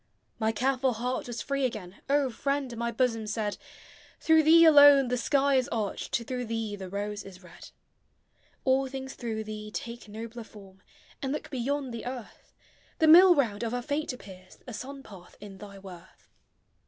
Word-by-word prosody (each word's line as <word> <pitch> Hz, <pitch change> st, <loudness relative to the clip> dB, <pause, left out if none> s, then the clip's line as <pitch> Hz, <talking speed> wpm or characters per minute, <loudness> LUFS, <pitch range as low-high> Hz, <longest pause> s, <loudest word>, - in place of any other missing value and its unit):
My 220 Hz, -1 st, +1 dB
careful 260 Hz, +2 st, 0 dB
heart 245 Hz, +3 st, -3 dB
was 235 Hz, -3 st, -5 dB
free 275 Hz, 0 st, -2 dB
again; 210 Hz, -7 st, -4 dB
O 280 Hz, -2 st, +2 dB
friend, 275 Hz, 0 st, -2 dB
my 235 Hz, +1 st, -2 dB
bosom 230 Hz, -2 st, 0 dB
said, 210 Hz, -1 st, -2 dB, 0.6 s
Through 320 Hz, 0 st, +4 dB
thee 330 Hz, +2 st, +7 dB
alone 285 Hz, -4 st, +8 dB
the 250 Hz, -, +1 dB
sky 275 Hz, +2 st, +2 dB
is 255 Hz, -, +1 dB
arched, 225 Hz, +1 st, -2 dB
Through 250 Hz, +1 st, -4 dB
thee 225 Hz, -2 st, -3 dB
the 190 Hz, -2 st, -8 dB
rose 205 Hz, +1 st, -4 dB
is 190 Hz, -1 st, -13 dB
red; 180 Hz, -, -13 dB, 1.0 s
All 265 Hz, 0 st, +2 dB
things 265 Hz, 0 st, -7 dB
through 220 Hz, -3 st, -4 dB
thee 215 Hz, 0 st, -7 dB
take 235 Hz, +2 st, -7 dB
nobler 230 Hz, +2 st, -7 dB
form, 195 Hz, -3 st, -16 dB, 0.4 s
And 270 Hz, -, -2 dB
look 300 Hz, -, -5 dB
beyond 270 Hz, 0 st, -2 dB
the 235 Hz, +1 st, -6 dB
earth; 250 Hz, -3 st, -9 dB, 0.5 s
The 320 Hz, -, +3 dB
mill 355 Hz, +3 st, +9 dB
round 230 Hz, -8 st, 0 dB
of 235 Hz, +1 st, -2 dB
our 245 Hz, -, -3 dB
fate 295 Hz, +3 st, -2 dB
appears 190 Hz, -7 st, -13 dB
A 245 Hz, -, -8 dB
sun 270 Hz, +5 st, -8 dB
path 185 Hz, -6 st, -14 dB
in 195 Hz, -2 st, -11 dB
thy 200 Hz, -1 st, -10 dB
worth. 185 Hz, -2 st, -14 dB
240 Hz, 175 wpm, -28 LUFS, 210-270 Hz, 1.0 s, mill